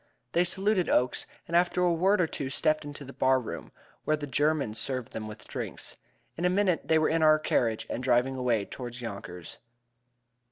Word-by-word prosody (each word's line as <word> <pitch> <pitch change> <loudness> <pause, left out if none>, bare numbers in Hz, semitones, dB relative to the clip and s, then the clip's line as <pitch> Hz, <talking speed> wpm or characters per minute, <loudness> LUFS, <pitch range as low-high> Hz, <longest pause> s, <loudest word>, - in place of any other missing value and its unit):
They 175 - +3
saluted 190 +1 +1
Oakes, 125 0 +1 0.2
and 170 - -2
after 175 +1 +3
a 175 -1 +3
word 190 +5 +3
or - - +4
two 140 -4 -4
stepped 155 +3 +2
into 145 -1 -8
the 135 - -10
bar 130 0 +3
room, 125 - -7 0.3
where 155 - +1
the 150 - -5
German 145 -3 +1
served 130 +2 -2
them 110 -1 -5
with 110 0 -10
drinks. - - -5 0.4
In 170 - -5
a 180 - +4
minute 185 -2 +1
they 160 - +4
were 155 - +3
in 165 0 +1
our 155 -1 +6
carriage 115 -7 0
and - - -4
driving 125 +1 +2
away 120 -5 +1
toward 120 +1 -7
Yonkers. 100 -7 -7
145 Hz, 195 wpm, -28 LUFS, 120-170 Hz, 0.4 s, our